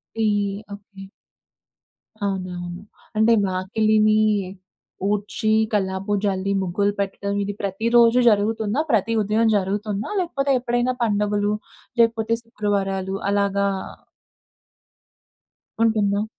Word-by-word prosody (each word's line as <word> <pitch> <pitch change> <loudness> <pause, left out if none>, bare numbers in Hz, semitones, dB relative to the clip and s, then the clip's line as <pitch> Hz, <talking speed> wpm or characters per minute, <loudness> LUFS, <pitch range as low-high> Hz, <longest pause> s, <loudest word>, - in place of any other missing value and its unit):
Tea. 225 - 0 0.5
Okay. 200 -1 -12 1.2
అవునవును. 180 -2 -4 0.4
అంటే 225 +2 +5
వాకిలిని 215 +3 +2 0.9
ఊడ్చి, 210 +2 -1 0.2
కల్లాపు 195 0 -1
జల్లి, 195 0 0
ముగ్గులు 200 +3 0
పెట్టడం 200 0 -3
ఇది 200 0 -3
ప్రతి 200 +3 -3
రోజు 235 +1 +6
జరుగుతుందా? 220 +4 +1
ప్రతి 225 +1 +2
ఉదయం 220 +2 +2
జరుగుతుందా? 205 +2 -2
లేకపోతే 280 -6 -1
ఎప్పుడైనా 245 +1 0
పండగలు, 205 -1 +1 0.5
లేకపోతే 230 -1 +2
శుక్రవారాలు 195 -3 -2
అలాగా 200 0 +1 2.2
ఉంటుందా? 210 -2 +2
205 Hz, 90 wpm, -22 LUFS, 195-220 Hz, 2.2 s, రోజు